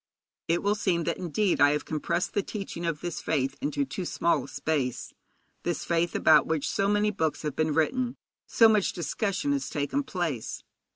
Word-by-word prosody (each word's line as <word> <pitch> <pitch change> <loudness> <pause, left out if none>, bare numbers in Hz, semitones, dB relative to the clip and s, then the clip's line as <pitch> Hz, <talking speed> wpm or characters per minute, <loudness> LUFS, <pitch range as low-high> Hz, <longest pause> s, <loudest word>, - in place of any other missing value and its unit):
It 170 +1 +1
will 205 +1 +3
seem 190 -5 0
that 170 +1 -2
indeed 180 -1 0
I 145 0 +6
have 150 - -2
compressed 155 +3 -1
the 205 - +2
teaching 195 -5 -5
of 160 -3 -2
this 175 -1 -4
faith 135 -4 0
into 145 -1 0
too 160 +8 -5
small 170 0 +1
a - - -11
space 140 -6 -2 0.5
this 175 -4 -2
faith 170 0 0
about 155 -3 +5
which 160 -3 0
so 195 - 0
many 205 +1 +2
books 160 -8 -1
have 150 -3 -3
been 155 -1 0
written, 245 +10 0 0.3
so 225 - +6
much 215 -3 +2
discussion 195 - -1
has 280 -1 -1
taken 150 - -1
place. 175 - -3
170 Hz, 185 wpm, -27 LUFS, 150-205 Hz, 0.5 s, I